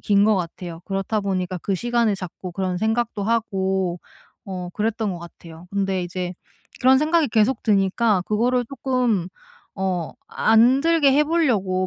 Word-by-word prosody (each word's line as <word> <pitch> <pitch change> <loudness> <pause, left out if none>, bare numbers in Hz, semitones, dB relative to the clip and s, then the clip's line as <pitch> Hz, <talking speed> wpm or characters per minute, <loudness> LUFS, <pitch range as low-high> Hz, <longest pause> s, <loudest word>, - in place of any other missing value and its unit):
긴 200 0 +3
것 215 0 +4
같아요. 170 -1 -5
그렇다 195 +2 -2
보니까 185 -2 -2
그 195 +3 -2
시간을 235 -1 +1
자꾸 185 0 -7
그런 185 0 -2
생각도 220 -1 -1
하고 190 -5 -1 0.4
어 185 -2 -5
그랬던 220 -1 -1
것 175 - -7
같아요. 170 0 -12
근데 195 -2 -1
이제 180 0 -4 0.5
그런 260 +1 +6
생각이 310 -1 +2
계속 220 +3 +2
드니까 200 0 +2
그거를 245 +4 +1
쪼끔 245 -8 -1 0.5
어 185 -4 -2
안 235 +5 +4
들게 325 -4 +4
해 295 +2 +4
보려고 210 - +1
200 Hz, 300 characters per minute, -22 LUFS, 185-235 Hz, 0.5 s, 그런